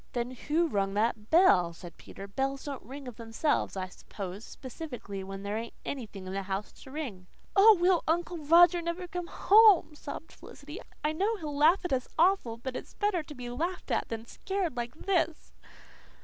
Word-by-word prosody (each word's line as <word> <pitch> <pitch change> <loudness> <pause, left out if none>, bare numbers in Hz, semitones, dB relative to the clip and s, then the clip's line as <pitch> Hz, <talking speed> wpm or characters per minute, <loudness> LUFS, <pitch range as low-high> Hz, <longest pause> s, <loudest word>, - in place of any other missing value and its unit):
"Then 240 0 -2
what 310 +6 0
rung 195 -1 0
that 215 0 0
bell?" 185 - +5
said 170 0 -11
Peter. 195 - -10
"Bells 270 +6 -2
don't 280 -2 -5
ring 270 +4 -9
of 245 - -8
themselves, 230 +1 -1
I 185 - -2
s'pose, 195 +2 -8
specially 245 -9 -7
when 195 +1 -7
there 205 +1 -2
ain't 230 0 -8
any 255 -6 -4
in 195 -2 -9
the 190 +1 -3
house 195 +1 -4
to - - -12
ring." 250 -11 -6 0.3
"Oh, 415 +1 +8
will 355 0 +3
Uncle 345 +1 0
Roger 345 +3 +6
never 340 +2 -4
come 355 0 -5
home!" 415 -5 +6
sobbed 300 +2 -8
Felicity. 295 +6 -11 0.2
"I 300 - +2
know 410 +7 0
he'll 300 -5 -5
laugh 325 +7 +4
at 355 - -1
us 255 -2 0
awful, 330 -9 +3
but 255 +2 -6
it's - - -8
better 410 -4 +1
to 300 -1 -11
be 245 -1 -6
laughed 340 +9 -3
at - - 0
than 225 0 -5
scared 380 +2 -3
like 240 +1 -4
this." 335 -2 -1
280 Hz, 190 wpm, -30 LUFS, 220-340 Hz, 0.3 s, Oh